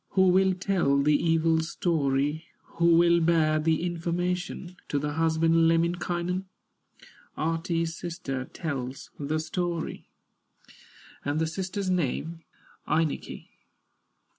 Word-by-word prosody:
Who 190 -1 +5
will 190 +1 +4
tell 180 -7 +1
the 145 +2 +3
evil 165 +1 +2
story, 155 -2 0 0.3
Who 170 0 +5
will 170 0 +5
bear 160 -2 +3
the 160 +1 +1
information 175 +1 -2
To 145 - -1
the 150 +1 -1
husband, 165 +1 +3
Lemminkainen? 175 +2 0 0.9
Ahti's 165 +1 -1
sister 135 -7 -4
tells 135 -6 -5
the 150 +2 -1
story, 170 +1 -3 1.2
And 145 +1 -1
the 160 - +1
sister's 190 +3 -3
name, 165 0 -1 0.5
Ainikki. 155 -1 -1
165 Hz, 105 wpm, -27 LUFS, 155-175 Hz, 1.2 s, Who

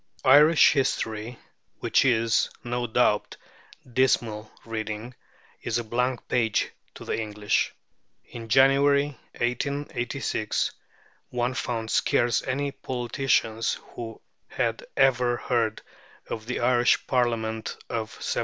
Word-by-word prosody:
Irish 150 +2 +7
history, 120 -4 -1 0.4
which - - +2
is, 115 -3 +2
no 120 0 -2
doubt, 110 -2 +1 0.6
dismal 115 -4 +1
reading, 110 +1 -5 0.5
is 115 0 -1
a 120 - -2
blank 125 +2 -1
page 115 -4 +1 0.2
to - - -10
the - - -2
English. 105 -1 0 0.5
In 115 -1 -9
January, 140 +3 +4 0.2
1886, 125 -2 -2 0.6
one 125 +1 -1
found 115 -3 -3
scarce 120 -2 +2
any 140 +2 -1
politicians 120 -3 -1
who 115 -2 -8 0.3
had 115 -2 -2
ever 125 -3 +3
heard 115 -3 -1 0.4
of 110 0 -6
the 125 - -2
Irish 120 -1 +3
Parliament 115 -3 -1
of 110 -1 -3
1782. - - -2
120 Hz, 105 wpm, -26 LUFS, 110-130 Hz, 0.6 s, Irish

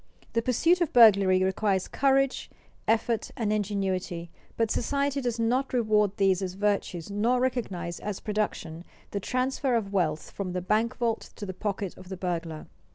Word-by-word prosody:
The 230 - +2
pursuit 330 +10 +2
of 340 - +1
burglary 200 -5 +6
requires 190 0 +1
courage, 275 -1 +1 0.4
effort, 225 0 +1
and 215 -3 0
ingenuity, 190 -4 -2 0.3
but 225 -1 +1
society 280 +2 0
does 240 -2 -1
not 250 +4 +1
reward 210 -4 +2
these 195 -1 +3
as 185 -1 -3
virtues 200 -3 -1
nor 230 +5 +2
recognize 195 -10 -2
as 205 -2 -4
production 205 -6 -3 0.3
the 200 - -2
transfer 255 +3 0
of 200 -4 -2
wealth 160 -5 0
from 185 -3 -4
the 180 - -2
bank 225 +6 +1
vault 235 -2 -1
to 205 - -6
the 190 - -5
pocket 200 -1 -3
of 185 - -12
the 190 - -5
burglar. 170 -3 -3
210 Hz, 160 wpm, -27 LUFS, 185-240 Hz, 0.4 s, burglary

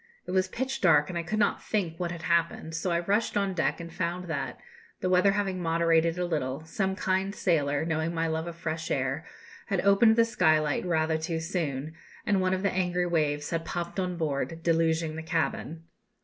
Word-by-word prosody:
It - - -6
was 185 0 +2
pitch 260 +7 -3
dark, 155 -5 +5
and 180 - -5
I 170 - 0
could 175 +6 -3
not 215 - +2
think 175 -7 -2
what 175 -1 -1
had 170 -1 -7
happened; 170 -1 0
so 165 +3 -2
I 170 0 +1
rushed 205 +5 0
on 200 -1 +1
deck, 170 -1 0
and 170 -1 -8
found 175 +1 -2
that, 145 -4 -3 0.4
the 185 - -1
weather 185 +2 +5
having 195 -3 -1
moderated 165 0 +2
a 180 - 0
little, 150 -3 -2
some 190 +3 -1
kind 190 +1 0
sailor, 145 -4 +1
knowing 160 0 -1
my 165 -1 -1
love 160 +1 -2
of 170 - -6
fresh 160 -1 -4
air, - - -1 0.4
had 195 -4 0
opened 200 +3 +5
the 230 0 +5
skylight 155 -6 +2
rather 160 -2 +1
too 160 +1 -2
soon, 160 -4 -3 0.3
and 200 -2 +2
one 185 0 +2
of 190 - -4
the 200 - +1
angry 180 -1 0
waves 150 -4 0
had 165 -1 -1
popped 175 +2 -4
on 180 -1 -2
board, 160 +1 -2
deluging 165 -1 +1
the - - -4
cabin. 160 0 -2
170 Hz, 205 wpm, -28 LUFS, 160-185 Hz, 0.4 s, dark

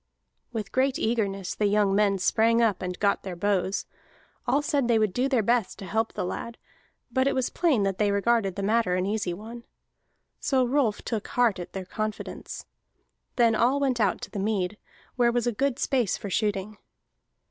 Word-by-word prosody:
With 215 -4 -4
great 265 +1 +1
eagerness 200 -5 -1
the 210 - +1
young 205 -1 +2
men 200 -1 +3
sprang 225 +5 +3
up 225 -4 +2
and 180 -1 -4
got 200 -1 +2
their 185 -2 -6
bows. 195 +1 0 0.6
All 275 +4 +2
said 290 -5 +1
they 235 -2 +4
would 215 -4 +1
do 255 +2 +1
their 250 -5 +2
best 235 -2 +1
to 195 - -8
help 220 +5 -1
the - - -2
lad, 235 +5 -5 0.5
but 260 0 +2
it 275 - +1
was 260 -1 0
plain 305 - +2
that 195 -1 -1
they 210 -1 +3
regarded 200 -1 +1
the 200 - -3
matter 215 -3 +2
an 185 0 0
easy 205 -2 -1
one. 225 +6 -8 0.8
So 260 -2 +2
Rolf 245 -5 +1
took 220 -3 -3
heart 240 -6 +2
at 175 - -8
their 190 -1 -5
confidence. 215 +3 -5 0.7
Then 235 -2 +4
all 250 +5 +2
went 265 -4 +1
out 205 -4 +1
to - - -7
the 205 - -4
mead, 200 -1 -1 0.4
where 240 -1 +4
was 240 0 0
good 275 +1 0
space 250 -9 +1
for 200 - -6
shooting. 210 +1 -1
215 Hz, 190 wpm, -26 LUFS, 195-240 Hz, 0.8 s, they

